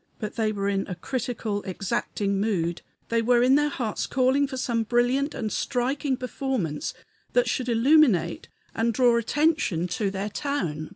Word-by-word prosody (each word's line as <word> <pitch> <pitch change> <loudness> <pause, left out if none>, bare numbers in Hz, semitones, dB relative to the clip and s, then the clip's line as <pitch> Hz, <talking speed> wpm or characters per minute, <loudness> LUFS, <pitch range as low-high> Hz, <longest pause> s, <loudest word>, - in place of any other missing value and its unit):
But 215 -2 -5
they 220 -2 +1
were 200 -1 -2
in 195 -1 0
a 180 - -4
critical, 225 -3 -3
exacting 195 +1 -2
mood; 175 -5 -1 0.3
they 230 0 +2
were 240 +1 +3
in 255 +1 +5
their 295 +1 +3
hearts 235 -7 -3
calling 270 +2 +2
for 265 -1 -6
some 235 -2 0
brilliant 245 +5 +1
and 220 -2 -3
striking 265 +2 -1
performance 250 - -3 0.4
that - - +3
should 255 -1 -1
illuminate 230 - +3 0.2
and 225 0 0
draw 245 -2 +4
attention 235 - +1
to 200 +3 -1
their 195 +2 -3
town. 190 - -3
235 Hz, 160 wpm, -26 LUFS, 200-265 Hz, 0.4 s, in